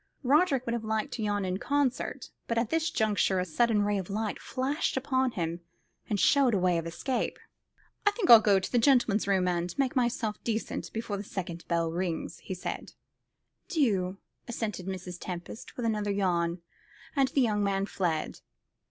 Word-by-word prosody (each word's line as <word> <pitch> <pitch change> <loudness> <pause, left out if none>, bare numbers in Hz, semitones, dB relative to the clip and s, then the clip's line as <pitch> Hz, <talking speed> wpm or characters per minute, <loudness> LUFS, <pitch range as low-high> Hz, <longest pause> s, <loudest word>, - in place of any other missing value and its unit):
Roderick 275 -1 +3
would 235 - -1
have 235 -2 -2
liked 220 0 -1
to 235 - -4
yawn 205 -2 0
in 185 +1 -2
concert, 280 -1 -1 0.2
but 230 - -1
at 230 -1 0
this 325 0 +1
juncture 215 - +1
a 180 - 0
sudden 210 +5 +2
ray 205 -1 +1
of 185 - -6
light 215 +1 -2
flashed 270 +2 -1
upon 260 -1 +1
him 170 -1 -2 0.5
and 205 - 0
showed 270 -2 +4
him - - +2
a - - -2
way 180 -2 +3
of 165 - -5
escape. 250 +10 -2 0.7
"I - - +10
think 410 -2 -2
I'll 230 - +11
go 205 -3 +4
to 190 - -5
the 245 - +3
gentleman's 235 -6 +3
room, 190 -2 +2
and 175 0 -1
make 270 -1 +1
myself 240 -4 0
decent 225 -1 -3
before 225 -2 -3
the 200 - -5
second 175 -4 -6
bell 165 -1 +1
rings," 170 -1 -3
he 185 - -6
said. 180 - -5 0.7
"Do," 200 - +1 0.3
assented 215 -6 -4
Mrs. 180 -2 -5
Tempest, 180 +4 -7
with 245 - -2
another 210 -2 0
yawn; 175 -3 0 0.5
and 275 -2 +4
the 270 +1 +1
young 210 -4 +2
man 195 -1 +1
fled. 170 -6 -2
210 Hz, 185 wpm, -29 LUFS, 185-245 Hz, 0.7 s, I'll